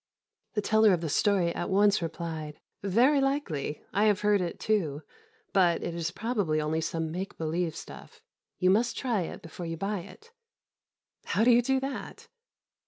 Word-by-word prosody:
The 210 - 0
teller 220 -1 +5
of 175 - 0
the 165 - -2
story 180 +1 +2
at - - -3
once 200 0 +4
replied, 160 -2 -5 0.2
"Very 245 +9 +3
likely, 200 - -2
I 205 +2 +3
have 210 -1 +3
heard 210 -1 +3
it 175 -1 -4
too; 160 -9 0 0.5
but 175 -3 +3
it 170 - -3
is 165 -1 -2
probably 200 -6 -1
only 155 +1 -1
some 160 0 -2
make 185 +4 -5
believe 165 +1 -1
stuff. - - -11 0.4
You 185 0 +3
must 230 +5 +2
try 235 -7 0
it 165 - -6
before 170 +1 -7
you 165 0 -4
buy 195 +3 -2
it." 435 - -13 0.9
"How 215 - +1
do 245 - +6
you 240 +1 +6
do 265 +2 +1
that?" 270 +1 -6
190 Hz, 170 wpm, -28 LUFS, 165-215 Hz, 0.9 s, do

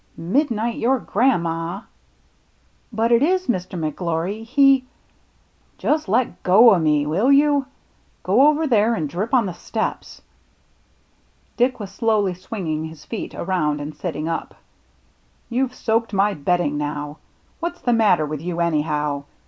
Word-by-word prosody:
Midnight 230 - -1
your 260 +3 +2
gran' 235 -3 +1
ma! 165 +4 -4 0.3
" - - -40
" - - -39 0.3
But 225 +1 0
it 235 0 +5
is. 370 +5 +2
Mr. 185 -5 -2
McGIory, 170 +6 -3
he 270 +2 +4 0.3
— - - -38
" - - -39
" - - -39
Just 305 -8 0
let 240 +4 0
go 215 +5 +6
o' 185 - +2
me, 150 -2 +2
will 190 - +2
you? 285 -1 +3 0.6
Go 275 - +4
over 305 +1 +2
there 230 -4 +2
and 155 -6 -2
drip 185 - -4
on 250 -5 +3
the 185 - -4
steps." - - -5 1.3
Dick 250 +1 +1
was 200 -2 -7
slowly 205 -2 +1
swinging 175 -4 -4
his 160 -2 -11
feet 225 - -6
around 155 -5 -1
and 145 +1 -6
sitting 160 -3 -4
up. 165 - -4 1.0
"You've 255 +1 -1
soaked 225 -1 -1
my 200 +1 +2
bedding 150 -2 0
now. 145 0 -4 0.4
What's 345 +1 -4
the 245 - +1
matter 205 -9 +3
with 150 -1 -5
you 170 0 -4
anyhow 150 -3 -1
195 Hz, 155 wpm, -21 LUFS, 160-240 Hz, 1.3 s, go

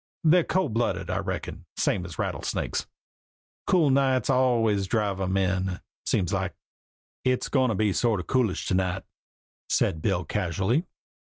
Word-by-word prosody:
They're 170 +2 +5
cold 185 -10 0
blooded, 120 +2 -1
I - - 0
reckin, - - -5
same 90 -3 +1
as 80 -5 -9
rattlesnakes. - - -2 0.8
Cool 160 -6 +4
nights 130 -2 +2
always 115 -6 +3
do - - -12
drive 100 -4 0
'em 95 +1 0
in, 95 -1 0 0.3
seems 90 -4 +1
like." - - -1 0.7
"It's 130 -1 +1
going 130 -2 +3
to 110 - 0
be 105 0 +2
sort 115 -2 +1
of 90 - -5
coolish 125 -8 +1
to - - +1
night," 95 0 0 0.7
said 80 - +1
Bill 90 -1 0
casually. 95 - 0
105 Hz, 155 wpm, -26 LUFS, 95-130 Hz, 0.8 s, They're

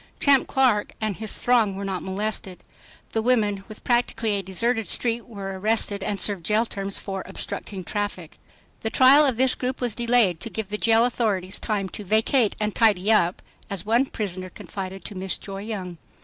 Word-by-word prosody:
Champ 280 -2 +4
Clark 250 -6 +2
and 215 -3 -2
his 220 -1 -2
throng 230 -5 +2
were 200 +1 -5
not 190 -2 -3
molested. 190 -1 -4 0.5
The 225 - 0
women 215 -5 +1
with 215 - -11
practically 240 -2 +1
a 200 -1 0
deserted 225 +4 -1
street 235 -1 +1
were 195 -4 -6
arrested 210 -1 +1
and 200 +1 -2
served 195 -2 -1
jail 215 +6 +2
terms 195 -3 -1
for 195 -1 -5
"obstructing 195 0 -4
traffic." 200 -4 -4 0.4
The 220 - -2
trial 265 +5 +7
of 255 -4 0
this 260 0 +4
group 255 +1 -3
was 245 -3 0
delayed 235 -7 +2
to 230 - -4
give 220 -3 -4
the 210 - -2
jail 225 +1 +4
authorities 205 -6 -1
time 205 -3 -1
to 210 - -6
"vacate 220 +3 +2
and 210 -1 -1
tidy 210 -3 +3
up," 180 -4 +2 0.3
as 195 -2 -4
one 235 +5 +3
prisoner 185 -5 -5
confided 190 0 -7
to - - -5
Miss 190 -1 -2
Joy 195 -1 -7
Young. 190 -6 -6
210 Hz, 185 wpm, -24 LUFS, 195-230 Hz, 0.5 s, trial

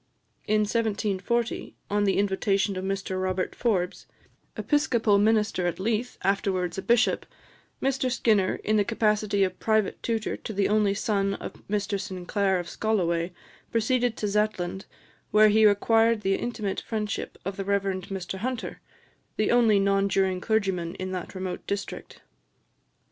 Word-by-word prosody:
In 215 0 +3
1740, 220 +1 -1 0.2
on 205 0 +2
the 195 - +2
invitation 195 0 +1
of 185 - -4
Mr 195 -1 -2
Robert 185 0 -1
Forbes, 190 -7 -1 0.5
Episcopal 235 -8 +2
minister 210 -4 +2
at 175 - -3
Leith, 225 +4 -1
afterwards 190 -2 0
a - - -3
bishop, 235 +2 +2 0.6
Mr 265 -1 +1
Skinner, 215 -6 +2
in 215 0 +2
the 205 - +4
capacity 210 -2 +1
of 185 -1 -2
private 220 -2 +1
tutor 225 -2 -1
to 220 - -7
the 200 0 +1
only 210 -1 +2
son 200 -1 0
of - - -7
Mr 205 -1 -1
Sinclair 190 0 -1
of 175 -1 -4
Scolloway, 175 -5 0 0.4
proceeded 240 +1 +1
to 210 - -1
Zetland, 200 -3 -1 0.4
where 215 0 +6
he 215 +1 +5
acquired 225 +2 +4
the 195 -1 +1
intimate 210 -2 -2
friendship 215 -2 -4
of 195 +1 -3
the 195 - -3
Rev. 200 0 +1 0.3
Mr 190 -1 -5
Hunter, 250 +2 -4 0.6
the 215 - +2
only 230 -4 +5
non 195 0 +2
juring 190 -1 +1
clergyman 190 -6 0
in 185 0 -5
that 185 +1 -5
remote 185 -1 -5
district. 200 0 -5
205 Hz, 145 wpm, -26 LUFS, 190-220 Hz, 0.6 s, where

